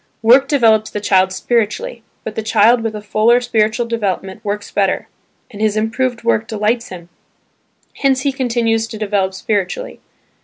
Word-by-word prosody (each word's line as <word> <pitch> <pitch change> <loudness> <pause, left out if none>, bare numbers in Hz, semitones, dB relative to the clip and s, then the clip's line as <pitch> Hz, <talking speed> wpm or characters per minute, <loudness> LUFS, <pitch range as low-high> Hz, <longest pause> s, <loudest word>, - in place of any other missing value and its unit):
Work 255 +5 +6
develops 225 -7 +3
the 210 - -4
child 190 -2 +2
spiritually; 240 - -1 0.2
but 220 - -5
the 220 - -3
child 220 +2 +3
with 225 -1 -3
a 210 - -7
fuller 220 +3 +3
spiritual 230 -1 0
development 205 -3 -3
works 205 -1 -4
better, 195 -2 0 0.4
and 210 - -9
his 215 -1 +1
improved 230 +2 -1
work 225 -1 +1
delights 220 +2 -1
him,– 175 -2 -10 0.9
hence 265 -2 +2
he 280 - 0
continues 230 -4 0
to 225 - -8
develop 200 -3 -1
spiritually. 205 - -3
220 Hz, 155 wpm, -17 LUFS, 210-240 Hz, 0.9 s, Work